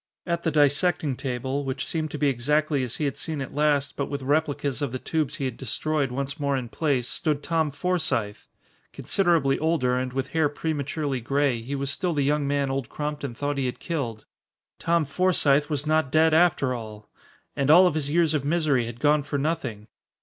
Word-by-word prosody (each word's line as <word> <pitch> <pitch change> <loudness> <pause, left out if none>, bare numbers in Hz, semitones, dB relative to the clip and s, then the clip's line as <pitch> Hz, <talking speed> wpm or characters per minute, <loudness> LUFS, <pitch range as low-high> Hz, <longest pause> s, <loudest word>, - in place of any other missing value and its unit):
At 170 -1 -1
the 170 - 0
dissecting 150 0 +2
table, 130 +2 -3
which 135 -1 -3
seemed 160 -2 -1
to 150 - -5
be 145 - +2
exactly 145 +3 +1
as 125 -3 -3
he 150 - -2
had 140 - -2
seen 155 -2 -4
it 135 - -5
last 145 -1 +1
but 140 - -2
with 140 -2 -4
replicas 145 -1 0
of 140 -4 -1
the 130 - -3
tubes 155 +1 -2
he 140 - -3
had 125 -3 -3
destroyed 140 +3 -1
once 140 +3 -4
more 140 -1 0
in 125 -3 -5
place, 135 -5 0
stood 150 -2 -1
Tom 160 -2 +1
Forsythe! 145 - -1 0.5
Considerably 165 -8 +1
older 155 -6 +1
and 130 0 -3
with 130 +1 -3
hair 160 0 +2
prematurely 145 -2 -2
gray, 135 -1 +1
he 135 +5 -4
was 140 0 -2
still 175 +4 -1
the 145 - +1
young 145 0 +1
man 140 -1 0
Old 135 -2 -3
Crompton 150 -4 -4
thought 145 +2 -2
he 130 - 0
had 125 - -4
killed. 120 -11 -4 0.5
Tom 170 -1 +2
Forsythe 145 -2 +2
was 145 -1 -2
not 155 -3 +1
dead 160 0 +4
after 160 -6 +3
all! 110 -3 -8 0.5
And 140 0 0
all 175 +4 +8
of 180 - +3
his 150 -2 -1
years 160 0 +2
of 150 -3 0
misery 145 -6 +1
had 120 0 -8
gone 150 +1 +3
for 145 0 -3
nothing. 135 -8 -2
145 Hz, 200 wpm, -25 LUFS, 135-155 Hz, 0.5 s, all